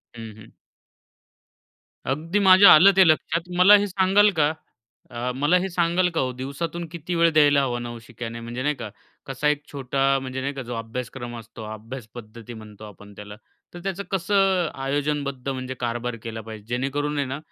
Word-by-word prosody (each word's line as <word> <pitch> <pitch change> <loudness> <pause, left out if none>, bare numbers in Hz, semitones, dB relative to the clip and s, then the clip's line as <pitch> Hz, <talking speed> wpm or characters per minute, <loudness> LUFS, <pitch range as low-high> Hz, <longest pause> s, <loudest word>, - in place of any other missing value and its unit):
हं, 115 -1 -8
हं. 110 +1 -15 1.6
अगदी 165 +7 -2
माझ्या 190 0 +8
आलं 180 +6 +8
ते 190 - +8
लक्षात. 160 +1 +1 0.2
मला 195 +3 +8
हे 205 0 -1
सांगाल 195 +2 +3
का 150 +1 +3 0.6
अ, 120 +1 -3
मला 145 +7 +2
हे 190 - -2
सांगाल 175 +1 +1
का - - +1
हो 130 - -1
दिवसातून 165 +6 -5
किती 170 +1 -5
वेळ 170 0 +4
द्यायला 145 -2 +5
हवा 120 -2 -2
नवशिक्याने, 115 0 -8
म्हणजे 120 +2 -6
नाही 150 +1 0
का, 115 -5 -7 0.4
कसा 135 +2 -2
एक 150 0 0
छोटा 135 -1 -3 0.2
म्हणजे 130 0 -5
नाही 140 +1 -3
का, 135 - -5
जो 120 0 -6
अभ्यासक्रम 120 +1 -6
असतो. 115 0 -11
अभ्यास 110 +2 -9
पद्धती 115 0 -10
म्हणतो 110 -1 -12
आपण 100 0 -13
त्याला. 105 0 -10 0.4
तर - - -7
त्याचं 195 0 -3
कसं 190 -2 +1 0.2
आयोजनबद्ध 140 -1 -2
म्हणजे 130 -1 -4
कारभार 120 0 -3
केला 115 -1 -6
पाहिजे? 110 -1 -10
जेणेकरून 140 +4 -2
आहे 140 - 0
ना, 135 +2 -5
135 Hz, 175 wpm, -23 LUFS, 120-165 Hz, 1.6 s, माझ्या